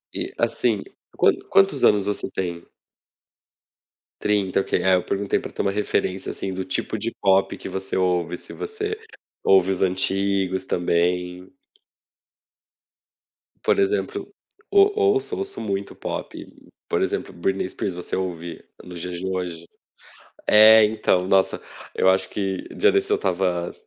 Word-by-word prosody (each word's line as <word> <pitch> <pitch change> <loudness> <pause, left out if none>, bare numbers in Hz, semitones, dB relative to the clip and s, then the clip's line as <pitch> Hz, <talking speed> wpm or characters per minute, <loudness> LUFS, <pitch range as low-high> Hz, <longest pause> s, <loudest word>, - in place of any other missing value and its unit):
E, - - -3
assim. 110 -5 +1 0.3
Quan - - +5 0.2
quantos 195 0 +3
anos 100 -2 +4
você 105 0 -2
tem? 85 -2 -4 1.6
30, 100 -2 +1
OK. - - -1
É, 95 0 +4
eu 90 - 0
perguntei 100 0 -1
pra - - -8
ter - - -3
uma 100 - +1
referência, 100 -2 -1
assim 95 - -4
do 95 0 -4
tipo 95 +3 -2
de 115 +2 -3
pop 95 0 +3
que - - -7
você 95 0 -4
ouve 90 -2 0
se - - -11
você 435 0 -4 0.4
ouve 95 -1 +4
os 95 - -2
antigos 95 0 +1
também. 90 +2 -1 2.1
Por - - +2
exemplo, 400 +1 -1 0.4
o 400 0 +6
ouço, 405 0 +2
ouço 390 +1 -5
muito 100 -2 -3
pop, - - -6 0.4
por - - +1
exemplo, - - -2
Britney 95 +2 -1
Spears, 95 - -4
você 90 0 -5
ouve 85 -3 -5 0.2
nos 90 -1 -9
dias 90 0 -5
de 95 - -5
hoje? 90 -3 -4 0.8
É, 110 +1 +8
então, 105 -3 +1
nossa, 95 0 +2 0.3
eu 95 - +4
acho 95 0 +2
que 95 -2 -3
dia 425 - +4
desses 395 0 +1
eu 420 - +4
estava, 90 - -1
95 Hz, 145 wpm, -23 LUFS, 90-105 Hz, 2.1 s, É